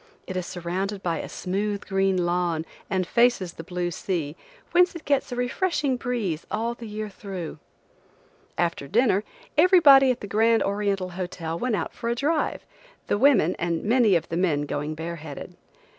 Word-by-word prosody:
It 185 - -6
is 180 -1 -2
surrounded 190 +3 -3
by 170 -2 -1
a - - -6
smooth 200 +2 -2
green 195 -2 +1
lawn 175 -2 0 0.2
and 185 -2 0
faces 235 -5 +2
the 165 - -8
blue 175 0 -3
sea, 165 -4 -3 0.4
whence 355 0 +4
it 335 - -8
gets 280 -2 +1
a - - -2
refreshing 275 +2 0
breeze 235 - -3
all 230 +2 -1
the 235 -1 -9
year 215 0 -4
through. 190 -6 -7 1.0
After 170 -5 -1
dinner, 210 - +3 0.4
everybody 310 -7 +7
at 250 -1 0
the - - -5
Grand 225 +3 +3
Oriental 200 -2 -1
Hotel 175 -2 -4
went 250 -3 0
out - - -3
for 235 - -4
a 235 - +1
drive, 300 +5 -1 0.4
the 205 - 0
women, 235 - +4
and 170 -1 -1
many 220 -3 +4
of 165 -1 0
the 170 - -2
men 160 -5 +1
going 145 +1 -3
bare 165 +2 -5
headed. 150 -2 -9
195 Hz, 175 wpm, -25 LUFS, 175-240 Hz, 1.0 s, everybody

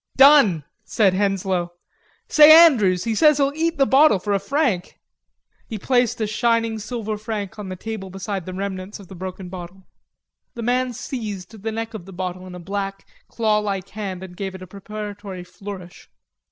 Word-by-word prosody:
"Done," 265 - +6 0.2
said 200 -4 +2
Henslowe. 190 -3 0 0.5
"Say, 305 0 +8
Andrews, 200 - +3
he 230 - -1
says 300 +5 +5
he'll 280 -1 +1
eat 330 0 0
the 275 - +4
bottle 270 -4 +5
for 205 +3 -2
a 200 - +2
franc." 215 - -1 0.7
He 220 - -5
placed 245 +2 +1
a 220 - 0
shining 230 +1 0
silver 215 -1 -4
franc 215 -2 -5
on 200 -2 -6
the 185 - -5
table 210 0 -6
beside 195 -1 -5
the 185 - -5
remnants 195 +1 -5
of 195 - -14
the 190 - -10
broken 185 +1 -7
bottle. 180 +1 -9 0.7
The 235 - -5
man 250 +1 0
seized 210 -7 -6
the 225 +2 -3
neck 225 +1 -4
of 205 -6 -8
the 195 - -10
bottle 185 0 -5
in 180 - -9
a - - -8
black, 195 +2 -4 0.2
claw 215 -2 +1
like 200 -2 -3
hand 195 -3 -5
and 180 -1 -10
gave 190 0 -5
it 185 - -9
a - - -8
preparatory 205 0 -8
flourish. 185 0 -10
205 Hz, 180 wpm, -22 LUFS, 185-225 Hz, 0.7 s, Say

